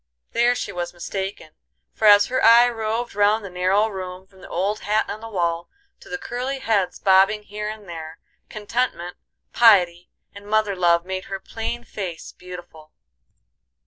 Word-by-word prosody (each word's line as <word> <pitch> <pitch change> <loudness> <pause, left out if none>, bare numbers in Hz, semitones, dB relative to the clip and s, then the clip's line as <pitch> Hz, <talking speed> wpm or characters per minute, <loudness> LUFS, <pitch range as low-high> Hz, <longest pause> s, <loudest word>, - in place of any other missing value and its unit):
There 240 +1 +3
she 205 - -4
was 175 -1 -5
mistaken, 190 -2 -5 0.4
for 220 - -2
as 205 0 +8
her 255 - -1
eye 235 +2 +8
roved 225 0 -3
round 205 +1 +2
the 195 - -8
narrow 185 +4 +2
room 185 -2 -7
from 190 0 -21
the - - -12
old 200 +5 -1
hat 215 +2 0
on 215 - -6
the 225 - -8
wall 170 -4 -2 0.3
to - - -16
the 180 - -3
curly 250 +7 -4
heads 200 -8 0
bobbing 195 +2 +4
here 210 +1 -5
and 215 -2 -9
there, 160 -1 -8 0.3
contentment, 215 -4 -3 0.4
piety, 180 -7 +4 0.2
and 200 0 -12
mother 215 -1 +1
love 170 -1 +2
made 185 0 -4
her 195 0 -5
plain 225 +4 -5
face 185 -8 -7
beautiful. 175 -4 -12
200 Hz, 165 wpm, -22 LUFS, 180-220 Hz, 0.4 s, as